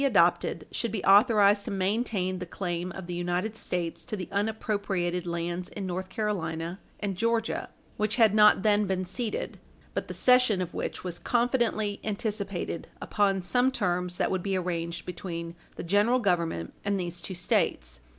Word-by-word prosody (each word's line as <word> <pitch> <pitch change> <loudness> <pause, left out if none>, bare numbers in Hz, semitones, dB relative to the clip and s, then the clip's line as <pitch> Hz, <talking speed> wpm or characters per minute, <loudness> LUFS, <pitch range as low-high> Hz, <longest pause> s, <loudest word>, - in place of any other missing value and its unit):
436 275 -6 +3 0.4
adopted 160 - -13
should 235 - -1
be 210 -3 -3
authorized 205 0 +6
to - - -4
maintain 195 -1 0
the 180 - -4
claim 175 0 -3
of 190 - -7
the 175 - -5
United 175 +5 -1
States 175 -6 -3
to - - -4
the 180 - -5
unappropriated 200 -4 -1
lands 170 +1 -3
in 200 - -5
North 185 +1 -3
Carolina 175 -4 -2 0.2
and 200 -2 -2
Georgia, 230 +2 0 0.3
which 215 0 0
had 225 -4 +5
not 210 -2 +6
then 210 -1 +3
been 185 0 -1
ceded 215 +5 -3 0.3
but - - -2
the - - -5
cession 250 -5 +4
of 180 -2 -3
which - - -4
was 175 -2 -4
confidently 235 -4 +1
anticipated 200 -5 -3
upon 195 -3 +1
some 250 +7 +3
terms 180 -7 -1
that - - +1
would 185 -1 0
be 195 0 0
arranged 170 -2 -3
between 170 -2 -5 0.2
the - - -6
General 205 +8 +3
Government 170 - 0
and 200 -1 0
these 175 -1 -4
two 185 - -6
States. 65 - 0
190 Hz, 170 wpm, -28 LUFS, 175-215 Hz, 0.4 s, authorized